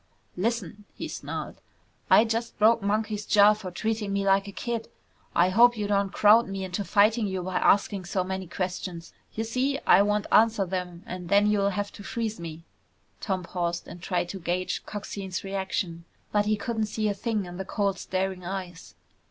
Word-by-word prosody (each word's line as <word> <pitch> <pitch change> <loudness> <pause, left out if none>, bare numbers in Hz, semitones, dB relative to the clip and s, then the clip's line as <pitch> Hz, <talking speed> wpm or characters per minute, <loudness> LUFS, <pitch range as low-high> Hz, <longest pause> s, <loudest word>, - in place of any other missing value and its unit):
"Listen," 210 -1 -2
he - - -5
snarled, - - -6 0.5
"I 220 - +7
just 230 +1 -2
broke 225 +2 +5
Monkey's 210 +1 -1
jaw 205 0 +6
for 210 -3 -7
treating 215 +2 -2
me 200 0 0
like 195 +1 +3
a - - -6
kid. 230 +2 -4 0.5
I 175 +2 +4
hope 235 +5 +5
you 210 - -1
don't 200 -1 +1
crowd 215 +3 +5
me 195 0 -4
into 185 +2 -3
fighting 210 +3 +3
you 190 -2 -3
by 185 0 -2
asking 200 -2 +2
so 185 +1 -1
many 190 0 -4
questions. 180 -1 -5 0.2
Y'see 255 +5 0
I - - +7
won't 210 0 +1
answer 220 -2 +4
them 180 -1 -4
and 180 -1 -7
then 200 +1 +5
you'll 200 -1 +2
have 205 +1 -3
to 205 - -11
freeze 220 0 -3
me." 165 -1 -7 0.6
Tom 190 -3 -2
paused 175 -1 -3
and 175 - -10
tried 175 -1 -1
to 195 - -5
gauge 180 +1 -2
Coxine's 200 -3 -5
reaction. 190 -3 -3 0.3
But 210 0 +2
he 215 - +3
couldn't 220 0 -2
see 215 0 -1
a 205 - +1
thing 210 0 -2
in 175 0 -8
the 190 - -3
cold 200 -1 -1
staring 185 -1 -2
eyes. 180 -2 -6
200 Hz, 185 wpm, -27 LUFS, 185-215 Hz, 0.6 s, I